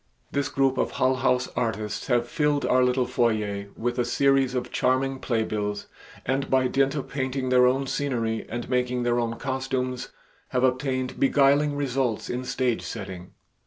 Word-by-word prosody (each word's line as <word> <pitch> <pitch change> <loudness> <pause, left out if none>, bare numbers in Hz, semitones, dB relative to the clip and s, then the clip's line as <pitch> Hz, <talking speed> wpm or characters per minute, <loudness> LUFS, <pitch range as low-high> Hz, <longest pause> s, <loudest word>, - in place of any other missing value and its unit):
This 140 0 -1
group 135 -1 +1
of - - 0
Hull 130 0 +2
House 125 0 +1
artists 110 -3 -3
have 120 -2 +2
filled 145 +1 +1
our 130 0 +4
little 125 0 +2
foyer 110 -5 0
with 120 +2 -2
a - - +3
series 135 +1 +2
of 125 - -3
charming 130 +1 +1
playbills 105 -4 -2 0.4
and 135 +1 -1
by 130 -1 +3
dint 135 +2 +1
of 140 - -3
painting 130 -1 -2
their 125 0 +5
own 135 +2 +1
scenery 120 -6 -2
and 120 +1 -4
making 125 -1 0
their 120 0 +1
own 115 -1 -1
costumes 130 -1 -3 0.4
have 125 - 0
obtained 130 0 0
beguiling 145 +1 +4
results 135 -5 -1
in 125 +1 -3
stage 125 -2 0
setting. 95 -4 -7
125 Hz, 160 wpm, -25 LUFS, 120-135 Hz, 0.4 s, their